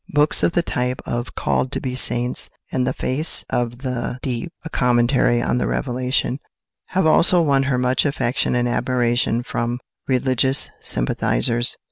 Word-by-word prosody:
Books 150 Hz, +1 st, +3 dB
of 170 Hz, -, +1 dB
the 175 Hz, -, +1 dB
type 125 Hz, -4 st, -2 dB
of 120 Hz, +1 st, -5 dB
"Called 130 Hz, -, -1 dB
to -, -, -1 dB
be 130 Hz, -2 st, -4 dB
Saints" 125 Hz, -1 st, +3 dB, 0.2 s
and 130 Hz, -1 st, -1 dB
"The 130 Hz, -, -1 dB
Face 145 Hz, +6 st, +2 dB
of 120 Hz, +2 st, -3 dB
the 125 Hz, -1 st, -3 dB
Deep: 130 Hz, +5 st, -4 dB
A -, -, -5 dB
Commentary 120 Hz, -1 st, +2 dB
on 125 Hz, -, 0 dB
the -, -, -1 dB
Revelation," 130 Hz, 0 st, -1 dB, 0.5 s
have 190 Hz, -1 st, 0 dB
also 170 Hz, +3 st, +4 dB
won 140 Hz, -5 st, +2 dB
her 125 Hz, -, +1 dB
much 125 Hz, +1 st, +1 dB
affection 140 Hz, -4 st, -1 dB
and 120 Hz, 0 st, 0 dB
admiration 120 Hz, -1 st, 0 dB
from 120 Hz, 0 st, -3 dB, 0.3 s
religious 130 Hz, 0 st, +2 dB
sympathisers. 90 Hz, -, 0 dB
125 Hz, 155 wpm, -20 LUFS, 120-135 Hz, 0.5 s, also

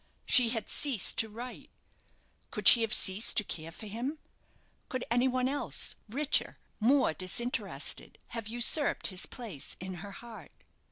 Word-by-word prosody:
She 245 Hz, -3 st, +5 dB
had 225 Hz, -3 st, -3 dB
ceased 265 Hz, -10 st, +2 dB
to 220 Hz, -, +1 dB
write. 240 Hz, +4 st, -9 dB, 0.8 s
Could -, -, -1 dB
she 235 Hz, -, +9 dB
have 225 Hz, -1 st, -1 dB
ceased 195 Hz, +2 st, +3 dB
to 215 Hz, -, +4 dB
care 165 Hz, -4 st, -6 dB
for 195 Hz, -, -10 dB
him? 240 Hz, +9 st, -4 dB, 0.7 s
Could 255 Hz, -1 st, -3 dB
any 245 Hz, +2 st, +3 dB
one 255 Hz, 0 st, 0 dB
else, 285 Hz, +2 st, 0 dB
richer 280 Hz, +6 st, 0 dB, 0.2 s
more 250 Hz, -, +3 dB
disinterested 235 Hz, +9 st, -2 dB
have 230 Hz, -3 st, -5 dB
usurped 240 Hz, +6 st, +2 dB
his 180 Hz, -, -1 dB
place 215 Hz, -, -6 dB
in 185 Hz, +1 st, -6 dB
her 200 Hz, -, -8 dB
heart? 220 Hz, -9 st, -13 dB
230 Hz, 150 wpm, -30 LUFS, 205-255 Hz, 0.8 s, she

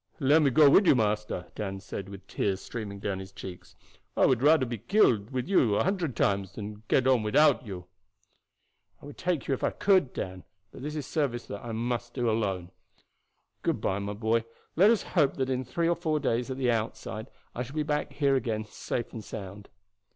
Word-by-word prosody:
"Let 145 Hz, +2 st, +5 dB
me 145 Hz, -, +4 dB
go 145 Hz, +4 st, +6 dB
with 185 Hz, +7 st, +6 dB
you, -, -, +7 dB
master," 105 Hz, -5 st, -1 dB
Dan 95 Hz, -2 st, -4 dB
said, 95 Hz, 0 st, -7 dB
with 100 Hz, 0 st, -10 dB
the -, -, -17 dB
tears 95 Hz, -2 st, 0 dB
streaming 105 Hz, -3 st, -6 dB
down 100 Hz, -1 st, -3 dB
his 95 Hz, 0 st, -9 dB
cheeks. 95 Hz, -2 st, -10 dB, 0.4 s
"I -, -, +5 dB
would 125 Hz, -2 st, +3 dB
rather 150 Hz, -1 st, +5 dB
be 120 Hz, -2 st, -5 dB
killed 115 Hz, -, +3 dB
with 130 Hz, 0 st, -3 dB
you 130 Hz, -, +3 dB
a -, -, +2 dB
hundred 175 Hz, -, -1 dB
times 100 Hz, -3 st, 0 dB
than 105 Hz, 0 st, -7 dB
get 130 Hz, -, +3 dB
on 130 Hz, -3 st, +4 dB
without 130 Hz, +4 st, +3 dB
you." 90 Hz, -3 st, -7 dB, 1.1 s
"I -, -, -14 dB
would 145 Hz, -, -10 dB
take 175 Hz, -5 st, -1 dB
you 140 Hz, -, +1 dB
if 130 Hz, -, -3 dB
I -, -, +3 dB
could, 185 Hz, -10 st, +2 dB
Dan; 90 Hz, -1 st, -5 dB, 0.3 s
but -, -, -11 dB
this 150 Hz, +3 st, -5 dB
is 150 Hz, -3 st, -3 dB
a -, -, -12 dB
service 135 Hz, -6 st, -1 dB
that 100 Hz, -, -7 dB
I 120 Hz, -, -5 dB
must 120 Hz, +1 st, -3 dB
do 120 Hz, -2 st, 0 dB
alone. 100 Hz, -6 st, -1 dB, 0.9 s
Good -, -, 0 dB
by, 95 Hz, -, -1 dB
my 100 Hz, +1 st, -4 dB
boy; 110 Hz, +2 st, +1 dB, 0.3 s
let 195 Hz, +6 st, +6 dB
us 230 Hz, -2 st, +3 dB
hope 150 Hz, -7 st, +1 dB
that 130 Hz, -1 st, -1 dB
in 130 Hz, 0 st, -1 dB
three 165 Hz, +7 st, -1 dB
or 170 Hz, -, +3 dB
four 160 Hz, -2 st, -1 dB
days 125 Hz, -3 st, 0 dB
at 130 Hz, -, -4 dB
the 125 Hz, -2 st, +2 dB
outside 110 Hz, 0 st, -3 dB, 0.3 s
I 120 Hz, -, -4 dB
shall 125 Hz, +4 st, -6 dB
be 155 Hz, -, +1 dB
back 150 Hz, -1 st, -2 dB
here 140 Hz, -1 st, +2 dB
again 110 Hz, -4 st, -1 dB
safe 115 Hz, +2 st, -4 dB
and 110 Hz, -, -6 dB
sound." 100 Hz, -1 st, -8 dB
120 Hz, 215 wpm, -28 LUFS, 105-145 Hz, 1.1 s, you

